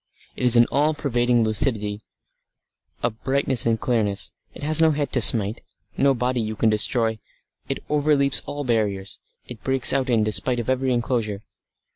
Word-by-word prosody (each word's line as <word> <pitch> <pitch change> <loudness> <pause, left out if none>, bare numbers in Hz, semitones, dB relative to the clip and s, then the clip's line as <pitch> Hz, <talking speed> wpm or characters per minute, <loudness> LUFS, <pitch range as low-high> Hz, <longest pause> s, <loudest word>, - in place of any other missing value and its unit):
It - - -6
is 125 -1 +7
an 120 - +6
all 150 +3 +1
pervading 120 -4 0
lucidity, 110 -2 0 1.0
a 120 - +1
brightness 130 +2 0
and 115 -1 +1
clearness. 105 -5 -1 0.2
It - - -10
has 155 +2 +2
no 160 - +5
head 145 -2 -2
to 125 - +1
smite, 110 0 +3 0.3
no 140 -1 +2
body 125 0 -1
you 110 0 -4
can 110 +1 +1
destroy; 110 +1 +1 0.5
it - - -4
overleaps 145 -2 +2
all 145 0 -5
barriers; 105 -6 -2 0.3
it 125 -3 -12
breaks 135 -1 +3
out 135 -1 -1
in 115 -3 +2
despite 115 +3 0
of 120 +2 -2
every 130 0 -1
enclosure. 115 -4 -2
120 Hz, 165 wpm, -22 LUFS, 110-135 Hz, 1.0 s, is